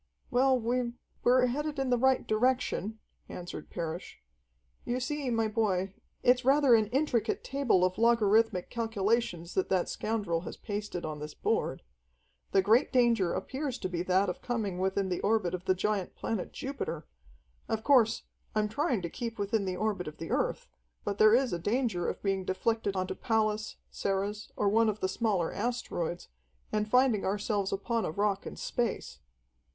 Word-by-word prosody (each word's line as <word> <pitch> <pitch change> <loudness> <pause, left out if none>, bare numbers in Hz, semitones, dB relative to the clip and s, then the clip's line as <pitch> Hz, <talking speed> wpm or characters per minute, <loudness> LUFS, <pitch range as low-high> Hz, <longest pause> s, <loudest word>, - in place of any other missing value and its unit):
"Well, 260 +1 +4
we 240 +1 -1 0.3
we're 250 +1 +5
headed 295 +4 -2
in 270 -2 0
the 245 - +4
right 265 +1 +3
direction," 225 -2 0 0.3
answered 180 0 -7
Parrish. 170 +1 -5 0.6
"You 245 +1 -1
see, 285 +1 -2
my 225 -2 +1
boy, 195 -4 0 0.3
it's 250 +1 +4
rather 275 0 +5
an 220 -2 +5
intricate 245 -2 0
table 265 -10 +2
of 185 +2 -2
logarithmic 225 -4 +3
calculations 220 -6 -1
that 190 - 0
that 185 -2 +1
scoundrel 205 -7 -1
has - - -7
pasted 205 -4 -4
on 155 -1 -5
this 150 0 -7
board. - - -1 0.7
The 195 - +4
great 225 +7 +4
danger 235 -8 +3
appears 265 +6 -3
to - - -3
be 175 -2 -2
that 185 +2 +2
of 180 - -4
coming 215 -7 -2
within 190 +1 0
the 180 - -2
orbit 210 -4 +1
of 180 0 -4
the 185 - +3
giant 200 0 -1
planet 220 -5 -3
Jupiter. 265 - -4 0.6
Of 220 0 -1
course, 245 -5 +4 0.3
I'm 210 0 +1
trying 245 -4 0
to 170 - -2
keep 230 -1 -5
within 205 0 0
the 185 -1 -2
orbit 205 -4 -1
of 155 - -7
the 165 - -6
Earth, - - 0 0.4
but 200 - -3
there 215 +1 +7
is 255 -3 +2
a 175 - -1
danger 210 -2 0
of - - -6
being 195 -1 0
deflected 200 +2 -1
onto 185 0 -1
Pallas, 215 -1 0 0.2
Ceres, 200 +2 -2
or 205 - +1
one 220 +2 +4
of 215 0 -3
the 190 - 0
smaller 190 -4 0
asteroids, 205 -7 -3 0.4
and 210 0 0
finding 250 -3 +4
ourselves 200 0 -1
upon 225 +3 -1
a - - -1
rock 200 +3 0
in - - -7
space." 235 - -3
215 Hz, 170 wpm, -30 LUFS, 190-240 Hz, 0.7 s, there